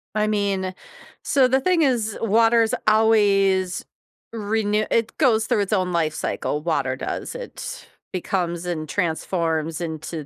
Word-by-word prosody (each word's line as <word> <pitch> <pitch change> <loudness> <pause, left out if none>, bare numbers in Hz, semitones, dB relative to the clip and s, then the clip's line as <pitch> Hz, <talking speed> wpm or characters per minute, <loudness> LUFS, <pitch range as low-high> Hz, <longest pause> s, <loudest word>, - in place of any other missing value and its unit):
I 215 0 +2
mean, 195 -3 -1 0.5
so 270 -2 +3
the 265 +1 +2
thing 360 +1 +2
is, 235 -7 +1
water's 225 +1 +3
always 200 -4 +3 0.5
renew 215 -1 0
it 230 -1 0
goes 225 -6 +3
through 210 - +1
its 200 +2 -2
own 185 -3 +1
life 160 -3 0
cycle, 150 -1 -2
water 140 -5 0
does, 130 - -5
it - - -8 0.2
becomes 175 -2 -2
and 160 -3 -3
transforms 165 -1 -1
into 160 -2 -5
200 Hz, 135 wpm, -23 LUFS, 170-225 Hz, 0.5 s, so